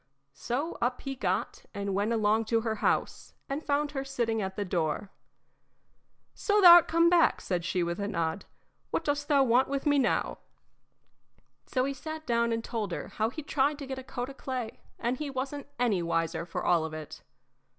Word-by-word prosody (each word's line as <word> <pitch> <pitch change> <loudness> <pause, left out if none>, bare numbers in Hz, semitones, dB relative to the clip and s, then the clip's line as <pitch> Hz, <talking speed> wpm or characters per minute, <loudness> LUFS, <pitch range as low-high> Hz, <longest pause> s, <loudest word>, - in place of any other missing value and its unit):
So 275 - -3
up 245 +1 0
he 275 - -4
got 265 - -2
and 200 -1 -2
went 205 +3 0
along 220 0 +2
to 225 +1 +1
her 220 -1 -2
house, - - -1
and 280 +3 -3
found 290 0 0
her 270 -2 -3
sitting 235 -5 -1
at 190 -1 -4
the 205 - -2
door. 175 +2 -2 1.2
"So 415 0 +1
thou 350 -3 +11
'rt 345 - -5
come 335 +1 +4
back," 340 -1 +4
said 180 -2 -2
she, 180 0 0
with 170 +2 -3
a 200 - -2
nod. 170 -2 -2 0.4
"What - - -1
dost 290 -1 -1
thou 280 -3 +4
want 255 +1 +3
with 275 +1 -3
me 290 -1 +4
now?" 250 - 0 1.3
So 255 -1 0
he 275 - -2
sat 315 +4 -7
down 235 -2 +1
and 230 0 -1
told 220 -6 -3
her - - -5
how 220 +1 -1
he'd 300 +4 -8
tried 285 +1 +1
to 285 - -7
get 265 0 -5
a - - -8
coat 255 0 -5
o' - - -10
clay, 255 -4 -5 0.2
and 240 +2 -1
he 300 0 -4
wasn't 275 +2 -4
any 230 -7 +1
wiser 165 0 -1
for 165 - -4
all 170 -2 +3
of 160 -1 -5
it. 155 -2 -8
245 Hz, 200 wpm, -29 LUFS, 200-280 Hz, 1.3 s, thou